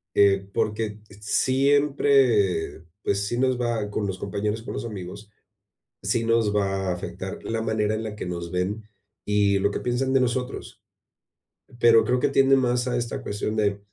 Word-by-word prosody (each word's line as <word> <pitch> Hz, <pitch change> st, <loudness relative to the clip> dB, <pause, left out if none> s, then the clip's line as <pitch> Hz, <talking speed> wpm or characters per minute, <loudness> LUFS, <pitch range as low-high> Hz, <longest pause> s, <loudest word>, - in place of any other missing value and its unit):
eh, 100 Hz, -1 st, +4 dB
porque 105 Hz, 0 st, -2 dB
t 100 Hz, -, -15 dB
siempre, 130 Hz, -, +2 dB, 0.2 s
pues, 100 Hz, 0 st, 0 dB
sí 120 Hz, +4 st, -2 dB
nos 130 Hz, -1 st, +2 dB
va 115 Hz, -4 st, -1 dB
Con 105 Hz, 0 st, -2 dB
los 95 Hz, -1 st, -4 dB
compañeros, 105 Hz, +2 st, -3 dB
con -, -, -7 dB
los -, -, -4 dB
amigos, 105 Hz, -1 st, -8 dB, 0.7 s
sí 115 Hz, -1 st, 0 dB
nos 115 Hz, -2 st, +2 dB
va 95 Hz, -1 st, 0 dB
a -, -, +1 dB
afectar 90 Hz, -, -6 dB
la 115 Hz, 0 st, -2 dB
manera 110 Hz, -1 st, 0 dB
en 110 Hz, -, -3 dB
la 110 Hz, -1 st, -5 dB
que -, -, -5 dB
nos 85 Hz, -1 st, -5 dB
ven 95 Hz, +4 st, -2 dB, 0.4 s
y 100 Hz, -1 st, +2 dB
lo 100 Hz, +1 st, +1 dB
que -, -, -3 dB
piensan 130 Hz, +2 st, -1 dB
de 135 Hz, -, +5 dB
nosotros. 125 Hz, 0 st, -3 dB, 0.9 s
P -, -, -18 dB
pero 115 Hz, -1 st, +6 dB
creo 125 Hz, +1 st, +1 dB
que 135 Hz, -, +2 dB
tiende 135 Hz, 0 st, +4 dB
más 125 Hz, -1 st, +1 dB
a 125 Hz, -, 0 dB
esta 120 Hz, +3 st, -3 dB
cuestión 105 Hz, -1 st, -3 dB
de 100 Hz, -2 st, +1 dB
110 Hz, 180 wpm, -25 LUFS, 100-125 Hz, 0.9 s, pero